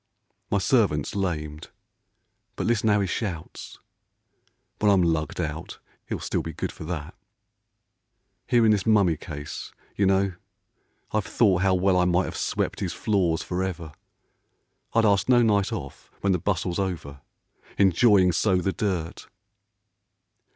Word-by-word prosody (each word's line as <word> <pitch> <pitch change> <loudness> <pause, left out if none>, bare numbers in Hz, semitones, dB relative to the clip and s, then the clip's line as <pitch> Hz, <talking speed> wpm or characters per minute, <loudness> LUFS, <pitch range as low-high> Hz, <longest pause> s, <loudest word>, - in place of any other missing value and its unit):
My 100 - +2
servant 95 - +2
's - - -6
lamed, 75 -6 -3 0.9
but - - -3
listen 115 -2 +1
how 105 -1 +3
he - - +1
shouts! 90 -4 -5 1.0
When 105 - +3
I'm 95 -2 +4
lugged 80 -2 -1
out, 80 -1 -4 0.3
he'll - - -3
still - - -2
be 80 - -6
good - - -4
for - - -10
that. 80 0 -5 1.3
Here 120 -2 +4
in 110 - +5
this 100 -2 0
mummy 100 -7 +4
case, 75 -1 -7 0.2
you 100 - +2
know, 95 0 +2 0.8
I've 110 -2 -1
thought 95 -6 +3
How 95 -1 +3
well 95 0 +2
I 90 - +3
might 90 +1 +2
have - - -6
swept - - -2
his - - -2
floors 90 -6 0
for 90 +1 -3
ever, 85 -4 -4 1.0
I'd 115 -1 +3
ask 100 -1 +2
no 120 -1 +6
night 100 -3 +2
off - - -7
when 100 - +2
the 90 - 0
bustle's 90 0 -1
over, 80 -8 -4 0.6
Enjoying 95 0 +5
so 95 +3 +2
the 90 +1 0
dirt. 90 -5 -3
95 Hz, 150 wpm, -25 LUFS, 85-100 Hz, 1.3 s, no